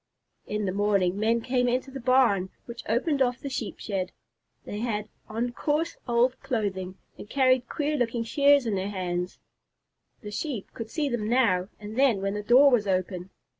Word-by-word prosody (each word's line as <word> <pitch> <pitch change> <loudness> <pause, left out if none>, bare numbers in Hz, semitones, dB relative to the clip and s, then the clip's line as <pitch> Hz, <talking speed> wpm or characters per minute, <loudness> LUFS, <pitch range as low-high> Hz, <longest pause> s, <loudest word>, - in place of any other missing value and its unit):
In 210 0 -2
the 185 - 0
morning, 200 -1 +1
men 230 +2 +2
came 250 0 +1
into 255 +2 -1
the 270 - -6
barn, 240 -7 +3 0.2
which 235 -1 -8
opened 275 +5 +1
off 250 -1 +2
the 280 - -6
Sheep 235 -5 -4
shed. 190 -3 -3 0.5
They 205 - -5
had 215 -2 -2 0.2
on 235 +3 -2
coarse, 305 +6 -1
old 245 +1 +2
clothing, 190 -5 -3 0.2
and 205 - -9
carried 255 -2 +3
queer 300 0 -1
looking 235 -2 0
shears 280 +3 +4
in 225 - 0
their 195 +1 -1
hands. 180 -2 -3 0.8
The 210 -3 -7
Sheep 240 -2 -4
could 225 -1 -6
see 300 +3 -1
them 235 -5 -2
now 205 -7 +2
and 210 +1 -8
then 260 -7 +4
when 195 0 -1
the 210 - -3
door 250 +6 +6
was 220 -5 +2
open. 185 -1 -1
230 Hz, 180 wpm, -27 LUFS, 200-255 Hz, 0.8 s, door